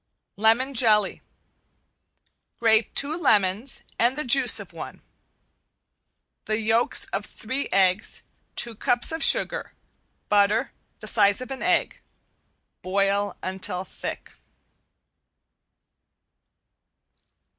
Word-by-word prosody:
~LEMON 225 +6 +2
JELLY~ 215 -5 +2 1.4
Grate 220 -1 +2
two 290 +3 +1
lemons 215 - 0 0.2
and 245 +4 +1
the 300 - -2
juice 255 -1 +4
of - - -11
one. - - -10 1.4
The 215 0 -1
yolks 225 +2 +2
of 195 - -2
three 260 +7 -5
eggs, 190 0 +1 0.3
two 235 - 0
cups 240 +5 +2
of 320 0 -1
sugar. - - +3 0.5
Butter, 210 +4 +2 0.3
the - - -8
size 200 +2 +4
of 255 +1 -6
an 265 - -6
egg. 350 0 0 0.8
Boil 200 +1 -1
until 185 0 -3
thick. - - -8
220 Hz, 95 wpm, -24 LUFS, 200-260 Hz, 1.4 s, juice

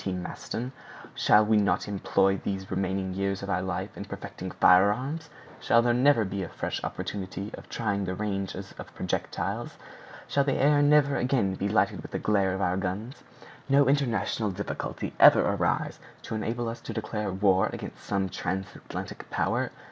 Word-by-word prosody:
T. 95 - -2
Maston, 105 +7 -5 0.4
"shall 105 +1 +5
we 110 0 +4
not 105 0 +1
employ 95 -1 +2
these 95 0 -4
remaining 95 0 -1
years 100 0 -2
of 100 - -3
our 90 0 +1
life 95 +1 -4
in - - -6
perfecting - - -7
firearms? 125 - +3 0.3
Shall 115 0 +4
there 120 0 +3
never 125 -2 +4
be 95 +1 -3
a 90 - -4
fresh - - -4
opportunity 100 +1 -4
of - - -10
trying 100 -3 -1
the 90 0 -3
ranges 95 -1 -4
of - - -10
projectiles? - - -3 0.5
Shall 140 - +2
the 135 -1 +1
air 145 +1 +4
never 145 -1 +4
again 125 -7 +1
be 100 +2 -2
lighted - - +1
with - - -9
the - - -3
glare 100 -3 +1
of 95 - -3
our 90 0 +1
guns? 100 +8 -4 0.5
No 140 0 +5
international 115 -6 +1
difficulty 100 +2 -4
ever - - +9
arise - - 0 0.2
to - - -6
enable 115 +2 -2
us 115 +1 -5
to 115 - -6
declare 105 -2 -3
war 95 0 +3
against - - -8
some 100 -1 0
transatlantic 95 +1 -5
power? - - 0
100 Hz, 170 wpm, -28 LUFS, 95-120 Hz, 0.5 s, ever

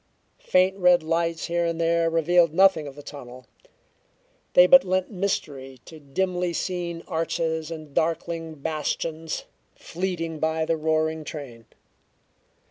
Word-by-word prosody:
Faint 185 +1 +2
red 180 -2 +5
lights 165 0 -1
here 170 0 0
and 165 -1 -2
there 165 0 +2
revealed 165 0 +3
nothing 190 -5 +4
of 135 - -9
the 145 - -11
tunnel; 130 -3 -10 1.1
they 180 - +8
but 270 +9 +8
lent 185 +1 -1
mystery 140 -9 -3
to 160 - -12
dimly 180 +4 -2
seen 170 -1 -3
arches 160 -2 -2
and 155 -3 -8
darkling 165 0 -2
bastions, 155 +2 -3 0.3
fleeting 165 -3 -4
by 160 0 0
the 165 - +1
roaring 160 0 0
train. 130 -7 -9
165 Hz, 130 wpm, -25 LUFS, 155-175 Hz, 1.1 s, they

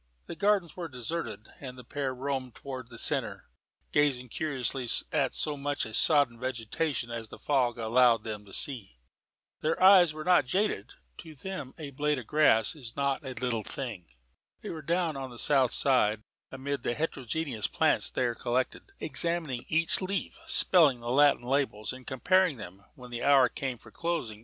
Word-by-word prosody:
The - - -7
Gardens 200 -4 +1
were 175 -2 -5
deserted, 125 -5 -5
and 130 -2 -8
the 125 - -10
pair 135 +2 -3
roamed 130 -1 -4
towards 130 -3 -8
the - - -11
centre, - - 0 0.5
gazing 135 -4 +2
curiously 130 -3 -2 0.2
at 140 -4 0
so 150 -1 0
much 145 0 -2
of 110 -1 -4
sodden 140 -6 +4
vegetation 130 +2 -2
as 115 -2 -5
the - - -10
fog 125 -5 0
allowed 115 0 +3
them 105 -2 -5
to 100 - -15
see. 110 - -1 0.6
Their 155 +1 -1
eyes 185 -3 +7
were 155 0 -7
not 180 -6 +4
jaded; 200 +9 -1 0.2
to 160 -2 -10
them 165 -3 -7
a 150 -4 -7
blade 150 +2 0
of 125 - -6
grass 115 -7 +3
was 125 -7 -9
not 140 +1 -1
a 130 -2 -5
little 125 -3 -1
thing. 105 -6 -6 0.6
They - - -5
were 160 - -6
down 170 0 0
on 135 -1 -5
the 120 - -12
south 135 -2 +3
side, 110 -6 +2 0.3
amid 135 0 -4
the 120 - -2
heterogeneous 140 -5 -2
plants - - +2
there 120 -2 -1
collected, 130 - -3
examining 165 -8 -1
each 165 +3 +3
leaf, 190 +1 -3
spelling 150 -9 +4
the 120 0 -4
Latin 145 -2 +4
labels 125 -4 -1
and 130 -1 -12
comparing 180 +3 +2
them, 95 -2 -10
when 125 -1 -12
the 120 0 -4
hour 135 -3 +5
came 130 -1 -4
for - - -16
closing. 165 -11 -3
135 Hz, 175 wpm, -29 LUFS, 120-155 Hz, 0.6 s, eyes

